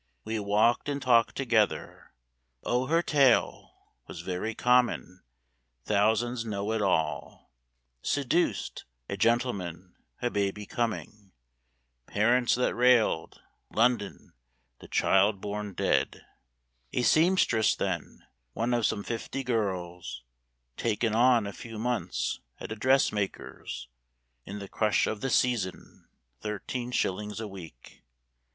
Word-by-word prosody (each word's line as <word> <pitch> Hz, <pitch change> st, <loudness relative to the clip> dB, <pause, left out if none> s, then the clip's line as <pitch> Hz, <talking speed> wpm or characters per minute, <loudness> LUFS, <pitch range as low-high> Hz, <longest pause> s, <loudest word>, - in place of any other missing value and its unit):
We 110 Hz, 0 st, -2 dB
walked 105 Hz, +6 st, +2 dB
and 140 Hz, 0 st, -1 dB
talked 120 Hz, -4 st, +3 dB
together. 115 Hz, -6 st, 0 dB, 0.5 s
O 125 Hz, +2 st, 0 dB
her 165 Hz, +3 st, +2 dB
tale 140 Hz, -7 st, +3 dB, 0.4 s
Was -, -, -7 dB
very 95 Hz, +4 st, -3 dB
common; 120 Hz, -7 st, +2 dB, 0.6 s
thousands 115 Hz, +3 st, +1 dB
know 105 Hz, -1 st, -3 dB
it 110 Hz, -1 st, 0 dB
all! 90 Hz, -5 st, -1 dB, 0.5 s
Seduced; 145 Hz, +5 st, 0 dB, 0.2 s
a -, -, -3 dB
gentleman; 95 Hz, -7 st, -1 dB, 0.3 s
a 120 Hz, -, -1 dB
baby 100 Hz, 0 st, -1 dB
coming; 105 Hz, -4 st, -4 dB, 0.7 s
Parents 120 Hz, +4 st, +3 dB
that 125 Hz, -, +1 dB
railed; 120 Hz, -8 st, +2 dB, 0.3 s
London; 115 Hz, -3 st, 0 dB, 0.5 s
the -, -, -12 dB
child 100 Hz, +1 st, +3 dB
born 105 Hz, 0 st, -5 dB
dead; -, -, 0 dB, 0.7 s
A 125 Hz, -, +1 dB
seamstress 155 Hz, -, +3 dB
then, 90 Hz, -4 st, -4 dB, 0.3 s
one 115 Hz, +3 st, -1 dB
of 120 Hz, -2 st, +2 dB
some 100 Hz, -, -2 dB
fifty 125 Hz, +3 st, -4 dB
girls 90 Hz, -, -3 dB, 0.5 s
"Taken 115 Hz, -1 st, 0 dB
on" 120 Hz, -1 st, +4 dB
a 100 Hz, -, -5 dB
few 115 Hz, +1 st, -9 dB
months 120 Hz, +2 st, -2 dB, 0.2 s
at -, -, -7 dB
a -, -, -2 dB
dressmaker's 105 Hz, -, -1 dB, 0.6 s
In 100 Hz, -, -6 dB
the 100 Hz, -1 st, -7 dB
crush 105 Hz, +1 st, +1 dB
of 110 Hz, -, -3 dB
the 135 Hz, -, -1 dB
"season;" 120 Hz, -8 st, -1 dB, 0.3 s
thirteen 105 Hz, -, -4 dB
shillings 105 Hz, -3 st, -2 dB
a 110 Hz, -, -4 dB
week! 85 Hz, -11 st, -12 dB
110 Hz, 115 wpm, -28 LUFS, 100-125 Hz, 0.7 s, on